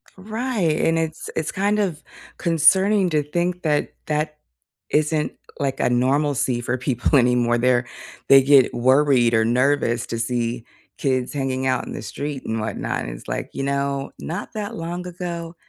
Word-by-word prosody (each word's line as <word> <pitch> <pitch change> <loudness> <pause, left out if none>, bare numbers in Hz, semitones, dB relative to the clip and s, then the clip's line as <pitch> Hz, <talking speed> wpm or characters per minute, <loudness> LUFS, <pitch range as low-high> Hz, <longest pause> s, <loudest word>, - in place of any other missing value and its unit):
Right, 215 -4 -1
and 165 0 +2
it's 160 -1 -3
it's 160 - -2
kind 205 +2 0
of 180 -7 -1 0.4
concerning 190 +4 +3
to 150 -1 +2
think 175 +4 -2
that 150 -2 0
that 150 0 -1 0.5
isn't 155 0 +1 0.3
like 135 -2 -1
a - - +2
normalcy 130 0 +1
for 120 +2 -1
people 130 +2 +1
anymore. 120 -1 +2
They're 120 0 +2 0.4
they 135 0 +9
get 135 -1 +5
worried 130 -1 +3
or 110 -1 +4
nervous 125 -1 +1
to 115 - -4
see 120 0 -2 0.3
kids 130 -2 -1
hanging 130 -2 -1
out 130 - 0
in - - -7
the - - -6
street 140 +5 -5
and 110 0 -2
whatnot, 110 - -3
and - - -5
it's - - -10
like, - - -3
you 135 - -3
know, 140 0 -1
not 175 +8 -5
that 215 +1 -4
long 175 0 -5
ago, 170 -1 -6
145 Hz, 165 wpm, -22 LUFS, 125-165 Hz, 0.5 s, they